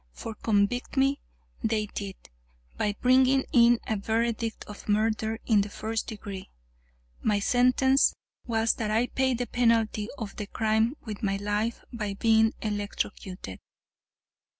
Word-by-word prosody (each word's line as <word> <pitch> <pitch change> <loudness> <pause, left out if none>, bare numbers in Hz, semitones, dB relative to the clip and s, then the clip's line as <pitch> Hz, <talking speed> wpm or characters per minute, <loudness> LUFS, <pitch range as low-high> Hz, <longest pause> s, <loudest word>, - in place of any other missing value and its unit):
For 225 - -6
convict 215 +5 0
me 270 +1 +2 0.4
they 215 -1 +1
did, 200 -2 -6 0.6
by 205 -1 -1
bringing 260 +1 +4
in 235 -1 +6
a 220 - -1
verdict 225 +2 -1
of 210 0 -11
murder 220 +1 +1
in 215 -3 +4
the 205 - -3
first 220 +2 -3
degree. 200 -3 -7 0.7
My 210 -2 +2
sentence 255 +4 +3 0.3
was 225 -1 +2
that 220 -2 -3
I 225 +3 +2
pay 260 0 0
the 245 +1 -2
penalty 230 -3 +1
of 215 -5 -6
the 210 - -4
crime 220 +4 +1
with 215 -1 -6
my 195 -2 0
life 210 +3 -2
by 210 -4 -3
being 225 +1 +3
electrocuted. 205 - -4
220 Hz, 135 wpm, -27 LUFS, 210-235 Hz, 0.7 s, in